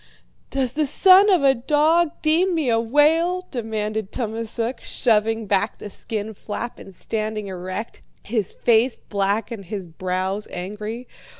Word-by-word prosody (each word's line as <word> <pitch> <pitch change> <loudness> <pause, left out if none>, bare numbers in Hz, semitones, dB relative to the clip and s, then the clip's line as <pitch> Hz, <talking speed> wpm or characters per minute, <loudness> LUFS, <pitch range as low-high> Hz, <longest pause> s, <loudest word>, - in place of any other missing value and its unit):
"'Does 260 -2 -1
the 305 0 0
son 385 +7 +6
of 365 -7 +4
a 270 -1 +6
dog 305 +6 +3
deem 340 +4 +3
me 305 -6 0
a 225 - +3
whale?' 320 +9 +2
demanded 220 -3 -3
Tummasook, 230 +1 -3
shoving 225 -1 +1
back 200 +1 0
the 205 - -8
skin 220 +1 -5
flap 220 +4 -6
and 195 - -12
standing 215 +1 -3
erect, 185 +3 -6 0.2
his 215 -3 -2
face 235 +2 +2
black 200 +2 -1
and 210 -4 -6
his 195 +1 -5
brows 185 +4 -3
angry. 210 +6 -6
225 Hz, 140 wpm, -22 LUFS, 205-270 Hz, 0.2 s, son